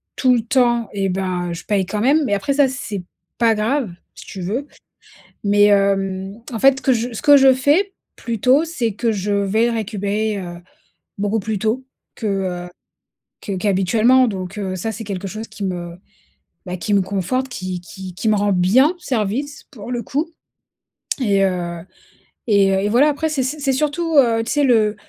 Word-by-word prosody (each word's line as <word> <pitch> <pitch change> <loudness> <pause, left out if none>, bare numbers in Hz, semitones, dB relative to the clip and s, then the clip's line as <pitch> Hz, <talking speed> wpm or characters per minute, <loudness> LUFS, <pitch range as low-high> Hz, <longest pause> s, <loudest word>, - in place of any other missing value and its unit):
tout 255 -1 +3
le 235 - +1
temps 235 -1 +2
et 195 -1 -1
ben, 180 -2 -2
je 170 - -7
paye 200 -3 +1
quand 210 - -3
même. 290 +6 +3
Mais 205 - 0
après 200 +8 -1
ça, 280 0 +4
c'est 225 -8 -5 0.4
pas 230 -1 +4
grave, 225 +1 0 0.2
si - - -12
tu 190 - -8
veux. 230 +11 -3 0.8
Mais 205 0 +4
hem, 195 -1 +1 0.2
en 230 - -3
fait, 270 +1 +4
que 265 - +3
je 240 +1 -2
ce 225 - -5
que 290 -1 +7
je 265 -1 +6
fais, 295 +10 +2 0.2
plutôt, 250 +6 +2
c'est 250 -10 -2
que 230 +3 0
je 205 -1 -2
vais 200 +3 +2
le - - 0
récupérer, 210 0 -2
heu, 175 -2 -7 0.6
beaucoup 205 +2 0
plus 210 +1 -3
tôt 220 +6 -1 0.3
que, 225 - -5
heu, 185 -3 -2 0.7
que 205 - -6
qu'habituellement. 215 +6 +3
Donc 190 -2 -5
heu, 190 -2 -3
ça, 205 +5 -3
c'est 220 +1 -7
quelque 195 -2 -5
chose 215 +4 -6
qui 215 -1 -8
me, 175 -2 -4 0.7
bah, 180 0 -4
qui 195 +4 -2
me 200 - +4
conforte, 200 +8 -2
qui 185 -6 -5
qui 185 +1 -9
qui 220 +5 -1
me 215 - +4
rend 205 0 +1
bien 220 - +4
service, 260 - -2
pour 235 -4 -10
le 240 -1 -2
coup 295 +9 -2 0.9
et 200 -4 +3
heu 175 -2 -2 0.7
et 200 -3 +4
heu 190 - +2
et 205 - 0
voilà. 255 +7 +4
Après, 300 +2 -1
c'est 290 -4 -1
c'est 285 +4 -3
c'est 275 -2 0
surtout, 310 +4 -1
heu, 230 -4 +4
tu - - -3
sais, 290 -1 +2
le 220 -5 +3
215 Hz, 190 wpm, -20 LUFS, 195-255 Hz, 0.9 s, que